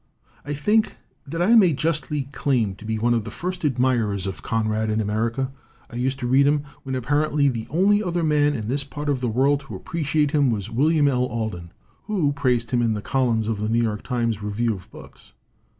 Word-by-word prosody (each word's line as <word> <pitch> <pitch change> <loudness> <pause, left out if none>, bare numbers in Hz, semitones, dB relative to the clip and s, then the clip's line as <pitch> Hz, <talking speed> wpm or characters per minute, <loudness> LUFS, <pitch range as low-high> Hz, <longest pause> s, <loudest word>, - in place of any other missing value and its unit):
"I 145 +1 -4
think 210 +9 +1 0.3
that 165 +5 -1
I 215 +6 +4
may 195 -8 +6
justly 150 -1 -1
claim 125 -8 0
to 110 - -12
be 110 0 -1
one 120 +2 +2
of 115 -2 0
the 115 - -6
first 180 - -5
admirers 120 -8 +1
of 95 -1 -5
Conrad 110 -1 -1
in 110 +1 0
America. 115 +5 -1 0.4
I 120 - -6
used 130 +2 -1
to - - -2
read 135 +3 +4
him 145 0 +2 0.2
when 130 -1 -4
apparently 145 +3 +1
the 115 -3 -4
only 200 +6 +3
other 175 -4 -1
man 150 -1 +2
in 110 -2 -4
this 140 +4 0
part 145 +2 -5
of 135 -3 0
the 125 - 0
world 135 +5 +2
to 135 -1 -9
appreciate 150 -3 -1
him 145 -3 +3
was 105 -5 -2
William 150 +5 +3
L. 125 -2 +2
Alden, 110 -8 -4 0.3
who 180 -10 0
praised 125 -4 0
him 120 -1 +2
in 115 -2 +1
the 105 - -4
columns 120 -5 +1
of 110 -2 -1
the 105 +1 -1
New 115 +1 +2
York 105 -2 -2
Times 115 -4 -1
Review 110 +3 -1
of 95 -3 -10
Books. - - -15
130 Hz, 215 wpm, -23 LUFS, 115-145 Hz, 0.4 s, may